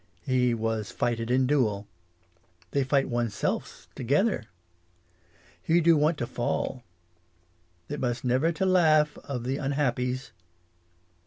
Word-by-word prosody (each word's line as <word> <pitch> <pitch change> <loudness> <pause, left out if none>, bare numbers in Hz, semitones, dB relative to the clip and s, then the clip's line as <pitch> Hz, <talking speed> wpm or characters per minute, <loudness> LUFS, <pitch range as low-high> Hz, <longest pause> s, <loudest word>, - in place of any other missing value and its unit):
He 125 0 +2
was 110 -2 -2
fighted 115 -1 -2
in 130 +1 +3
duel. 110 -8 +1 0.8
They 140 - +1
fight 135 +1 +1
one's 120 -4 -1
selfs - - -3
together. 140 - +1 1.2
He 165 +2 +3
do 170 0 +5
want 150 +2 +2
to 120 - -2
fall. 120 +2 -2 1.1
It 145 0 -5
must 120 -1 -2
never 130 +7 +2
to 170 +3 -1
laugh 155 -5 +4
of 125 -4 -5
the 130 +2 -1
unhappies. 130 -2 -1
130 Hz, 120 wpm, -27 LUFS, 120-150 Hz, 1.2 s, do